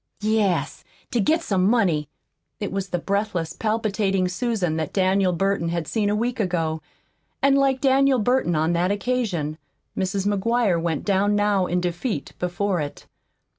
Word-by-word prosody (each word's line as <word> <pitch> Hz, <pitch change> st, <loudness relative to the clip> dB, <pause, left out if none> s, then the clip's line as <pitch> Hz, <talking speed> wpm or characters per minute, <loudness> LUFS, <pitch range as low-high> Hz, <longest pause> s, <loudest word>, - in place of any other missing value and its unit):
"Yes, 215 Hz, -4 st, 0 dB, 0.3 s
to 240 Hz, -, +1 dB
get 320 Hz, -, +2 dB
some 190 Hz, -, +1 dB
money." 185 Hz, -, +2 dB, 0.5 s
It 205 Hz, -, -3 dB
was 195 Hz, 0 st, -3 dB
the 175 Hz, -, -1 dB
breathless, 200 Hz, -3 st, -2 dB
palpitating 210 Hz, -4 st, 0 dB
Susan 185 Hz, -4 st, -1 dB
that 155 Hz, -2 st, -3 dB
Daniel 190 Hz, -1 st, +2 dB
Burton 195 Hz, -1 st, 0 dB
had 170 Hz, -2 st, -2 dB
seen 210 Hz, -3 st, 0 dB
a 205 Hz, -, +1 dB
week 240 Hz, +3 st, -1 dB
ago, 165 Hz, -5 st, -1 dB, 0.6 s
and 275 Hz, 0 st, +5 dB
like 270 Hz, -2 st, +2 dB
Daniel 270 Hz, 0 st, +4 dB
Burton 245 Hz, -6 st, +1 dB
on 160 Hz, +2 st, +1 dB
that 175 Hz, +2 st, +1 dB
occasion, 200 Hz, -8 st, -1 dB, 0.4 s
Mrs. 190 Hz, +1 st, -1 dB
McGuire 205 Hz, -2 st, +1 dB
went 165 Hz, -3 st, -2 dB
down 205 Hz, +1 st, +2 dB
now 205 Hz, -3 st, +2 dB
in 180 Hz, +1 st, 0 dB
defeat 180 Hz, +7 st, -3 dB
before 180 Hz, 0 st, -1 dB
it. 145 Hz, -1 st, -6 dB
195 Hz, 155 wpm, -23 LUFS, 175-220 Hz, 0.6 s, and